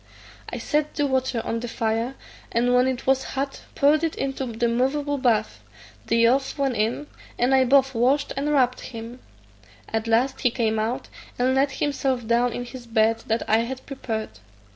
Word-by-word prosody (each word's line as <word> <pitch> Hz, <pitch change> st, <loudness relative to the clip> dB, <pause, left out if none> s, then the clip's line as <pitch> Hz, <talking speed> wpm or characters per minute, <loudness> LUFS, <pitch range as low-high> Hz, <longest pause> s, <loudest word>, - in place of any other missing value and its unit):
I -, -, -4 dB
set 300 Hz, 0 st, -1 dB
the 290 Hz, -, +1 dB
water 260 Hz, -3 st, 0 dB
on 230 Hz, -, -1 dB
the 240 Hz, -, -5 dB
fire, 230 Hz, +2 st, -1 dB, 0.4 s
and 245 Hz, +2 st, +2 dB
when 250 Hz, +1 st, +4 dB
it 260 Hz, -2 st, -2 dB
was 265 Hz, 0 st, +3 dB
hot 275 Hz, +1 st, -3 dB
poured 295 Hz, +3 st, +4 dB
it 325 Hz, -, 0 dB
into 270 Hz, -1 st, -3 dB
the 235 Hz, 0 st, -1 dB
moveable 275 Hz, +4 st, 0 dB
bath; 225 Hz, -4 st, +1 dB, 0.5 s
the 230 Hz, -, +2 dB
youth 255 Hz, +6 st, +3 dB
went 275 Hz, -3 st, 0 dB
in, 225 Hz, +7 st, 0 dB, 0.3 s
and 245 Hz, +2 st, +2 dB
I 260 Hz, -1 st, +5 dB
both 270 Hz, +1 st, +4 dB
washed 265 Hz, +5 st, +2 dB
and 280 Hz, +2 st, -1 dB
rubbed 255 Hz, -4 st, +2 dB
him. 230 Hz, 0 st, -8 dB, 0.7 s
At 225 Hz, 0 st, -2 dB
last 245 Hz, +4 st, +1 dB
he 250 Hz, -, +4 dB
came 225 Hz, -2 st, 0 dB
out, 225 Hz, +3 st, -2 dB, 0.3 s
and 255 Hz, +1 st, +2 dB
laid 270 Hz, +1 st, +2 dB
himself 265 Hz, -4 st, -1 dB
down 235 Hz, +2 st, +2 dB
in 245 Hz, +1 st, -4 dB
his 245 Hz, -1 st, -10 dB
bed 225 Hz, 0 st, +2 dB
that 225 Hz, +1 st, -1 dB
I 220 Hz, -, +4 dB
had 255 Hz, +3 st, -4 dB
prepared. 225 Hz, -6 st, -4 dB
250 Hz, 185 wpm, -24 LUFS, 230-270 Hz, 0.7 s, I